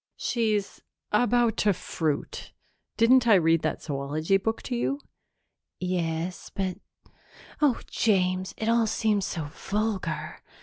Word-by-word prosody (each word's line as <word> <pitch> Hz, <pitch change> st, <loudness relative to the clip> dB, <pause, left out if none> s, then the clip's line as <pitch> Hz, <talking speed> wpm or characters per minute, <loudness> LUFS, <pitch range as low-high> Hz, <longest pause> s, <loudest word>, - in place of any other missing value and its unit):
"She's 215 Hz, -4 st, -1 dB, 0.3 s
about 240 Hz, +1 st, +3 dB
to 205 Hz, -1 st, +3 dB
fruit. 160 Hz, -4 st, -3 dB, 0.4 s
Didn't 245 Hz, +2 st, +5 dB
I 220 Hz, -, +7 dB
read 165 Hz, -2 st, +4 dB
that -, -, -2 dB
zoology 150 Hz, +5 st, 0 dB
book 225 Hz, +3 st, -2 dB
to 250 Hz, -, -3 dB
you?" 275 Hz, +4 st, -1 dB, 0.8 s
"Yes, 175 Hz, -1 st, -2 dB
but 190 Hz, -2 st, -2 dB, 0.8 s
oh, 285 Hz, -5 st, +3 dB
James, 185 Hz, -3 st, +1 dB
it 220 Hz, -, -3 dB
all 230 Hz, -1 st, +3 dB
seems 210 Hz, -2 st, +1 dB
so 155 Hz, -3 st, -4 dB
vulgar! 210 Hz, +1 st, -3 dB
195 Hz, 120 wpm, -27 LUFS, 175-225 Hz, 0.8 s, I